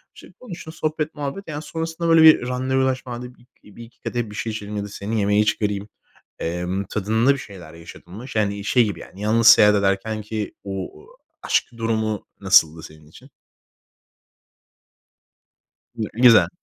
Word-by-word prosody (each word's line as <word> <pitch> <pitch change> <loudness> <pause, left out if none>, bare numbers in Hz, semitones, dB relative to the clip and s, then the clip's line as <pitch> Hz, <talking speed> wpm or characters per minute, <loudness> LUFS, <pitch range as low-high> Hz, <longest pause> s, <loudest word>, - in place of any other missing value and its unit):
İşte, - - -14
konuştun 175 -9 -9
sohbet, 155 -1 -3
muhabbet, 150 +7 -5
yani 150 -2 -5
sonrasında 165 +2 -4
böyle 165 -1 +6
bir 155 -6 +7
randevulaşma, 130 0 -1
"Hadi 125 +1 -8
bi - - -24 0.3
bir 115 - -10
iki 115 +1 -18
kadeh 120 -3 -3
bir 105 - -10
şey 110 - -3
içelim 105 -1 -6
ya 100 - -2
da 100 - -6
seni 105 +2 -4
yemeğe 105 +1 +2
çıkarayım.", 105 -1 -1 0.5
emm, 90 +3 -3
tadında 110 +6 +1
bir - - -6
şeyler 90 -9 -11
yaşadın 85 +1 -13
mı? 115 +5 -9
Yani, 100 -2 -1
şey 120 +2 +3
gibi, 100 -6 -4
yani, 95 - -13
yalnız 110 +2 +1
seyahat 105 -2 +8
ederkenki 105 +2 -2
o 95 -1 -5 0.5
aşk - - +1
durumu 110 -2 -2
nasıldı 80 +1 +4
senin 75 -1 -14
için? 75 - -17 2.6
Gü 110 -3 -4
güzel. 120 0 +6
110 Hz, 155 wpm, -22 LUFS, 100-125 Hz, 2.6 s, seyahat